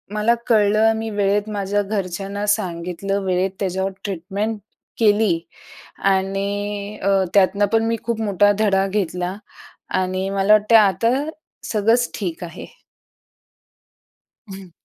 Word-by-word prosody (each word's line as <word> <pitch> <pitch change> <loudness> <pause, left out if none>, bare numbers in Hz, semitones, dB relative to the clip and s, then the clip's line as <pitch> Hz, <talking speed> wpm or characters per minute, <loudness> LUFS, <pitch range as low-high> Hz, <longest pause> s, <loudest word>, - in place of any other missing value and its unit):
मला 215 +3 +3
कळलं 215 -1 +4
अ, 225 - +2
मी 225 0 -4
वेळेत 205 +1 +1
माझ्या 205 0 -1
घरच्यांना 200 0 -3
सांगितलं 180 +1 -3
वेळेत 185 +1 0
त्याच्यावर 190 0 -1
ट्रीटमेंट 200 +3 -3 0.4
केली 210 -5 +3 0.7
आणि 200 +2 -2
अ, 200 - +2 0.2
त्यातनं 200 +1 +4
पण 225 0 +3
मी 230 - 0
खूप 230 -1 -2
मोठा 205 -1 +3
धडा 195 -2 +2
घेतला 185 -1 -2 0.6
आणि 185 +1 -2
मला 195 +1 +3
वाटतं 215 +2 +4
आहे 215 -2 +8
आता 195 +5 +1 0.6
सगळंच 225 +3 +2
ठीक 180 -4 -4
आहे. 170 - -8 1.8
हं. 190 -2 -10
200 Hz, 120 wpm, -21 LUFS, 190-215 Hz, 1.8 s, आहे